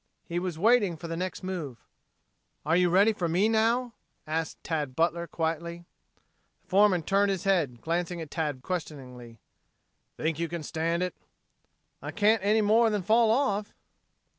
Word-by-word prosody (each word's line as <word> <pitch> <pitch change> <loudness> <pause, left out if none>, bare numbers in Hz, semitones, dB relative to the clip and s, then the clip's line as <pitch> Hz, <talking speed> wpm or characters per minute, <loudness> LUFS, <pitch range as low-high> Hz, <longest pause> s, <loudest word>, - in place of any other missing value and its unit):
He 170 +1 -2
was 180 -3 -4
waiting 205 -3 +3
for 170 - -8
the 165 - -4
next 185 +2 -4
move. 170 -10 -5 0.9
"Are 160 +2 +2
you 180 0 +3
ready 200 +5 +4
for 175 -5 -2
me 185 +6 +2
now?" 230 +2 +1 0.3
asked 160 0 -3
Tad 150 -5 -3
Butler 170 +2 0
quietly. 170 +1 -3 0.8
The - - -38
foreman 190 -3 +4
turned 200 +4 +2
his 190 -3 -2
head, 160 -12 0
glancing 175 +1 -2
at 160 -3 -7
Tad 150 -6 -3
questioningly. 130 -9 -6 0.8
"Think 160 0 -2
you 170 - -1
can 170 -1 -5
stand 165 +3 -1
it?" 180 - -3 0.9
"I - - -6
can't 215 -1 +2
any 215 +2 +3
more 225 +2 +4
than 210 -3 -1
fall 225 +4 +4
off." 215 -4 0
175 Hz, 160 wpm, -28 LUFS, 160-205 Hz, 0.9 s, ready